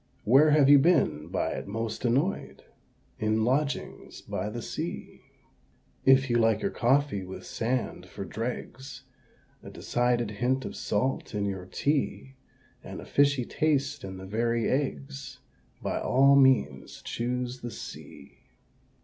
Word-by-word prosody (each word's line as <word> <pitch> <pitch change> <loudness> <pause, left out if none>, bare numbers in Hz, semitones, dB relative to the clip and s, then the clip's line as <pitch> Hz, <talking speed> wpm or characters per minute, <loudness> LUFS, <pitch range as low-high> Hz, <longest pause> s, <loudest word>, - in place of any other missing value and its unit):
Where 135 +7 +6
have 150 -2 +5
you 145 0 +8
been 135 - +2
by 90 +2 -1
it - - -5
most 115 +4 -4
annoyed? 140 +11 -1 0.6
In 110 +1 +1
lodgings 140 +4 -2
by 105 - -4
the 120 +2 -6
Sea. - - -6 0.8
If 135 0 +6
you 120 -1 +2
like 110 -2 +2
your - - 0
coffee 130 -4 +1
with 95 +1 -9
sand 115 -6 -3
for 95 +2 -7
dregs, 125 - -6 0.6
A - - -10
decided 120 -2 0
hint 125 +5 -1
of - - -6
salt 115 +1 -2
in 100 -1 0
your 95 -2 -4
tea, 140 +4 -1 0.5
And - - -8
a - - -9
fishy 140 -3 +2
taste 150 -1 0
in 95 -1 -7
the 95 - -9
very 115 +3 0
eggs 135 -1 -3 0.5
By - - -1
all 140 +2 +4
means 135 -2 +2
choose 125 +1 -3
the 120 - -5
Sea. - - -10
125 Hz, 140 wpm, -28 LUFS, 110-135 Hz, 0.8 s, you